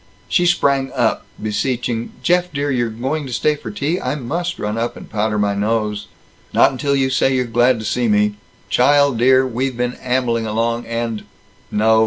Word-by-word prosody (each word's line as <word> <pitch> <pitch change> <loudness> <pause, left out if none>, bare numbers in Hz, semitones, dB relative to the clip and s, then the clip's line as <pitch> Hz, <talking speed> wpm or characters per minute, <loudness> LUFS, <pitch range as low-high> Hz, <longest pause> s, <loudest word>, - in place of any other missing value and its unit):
She 175 -1 +2
sprang 140 -6 +2
up, 120 -4 0
beseeching, 115 +2 -2
"Jeff 180 0 +2
dear, 145 0 -1
you're 120 -3 0
going 135 +6 -3
to - - -7
stay 150 +6 +2
for - - -8
tea? 180 -3 -2
I - - -1
must 170 +6 -3
run 105 +1 -3
up 115 +1 -2
and - - -10
powder 105 0 -1
my 105 -1 +1
nose." 105 0 -1 0.5
"Not - - +5
until 140 +2 0
you 135 -1 +1
say 135 0 +2
you're 125 -1 +1
glad 120 +2 +3
to 110 - -6
see 120 +3 0
me. 105 -1 +2 0.3
Child 140 -1 +3
dear, 130 +2 +5
we've 130 0 -2
been 125 0 -1
ambling 125 -3 0
along 115 +2 -1
and 115 -1 -3 0.4
No. 110 +1 +3
125 Hz, 185 wpm, -19 LUFS, 115-135 Hz, 0.5 s, Not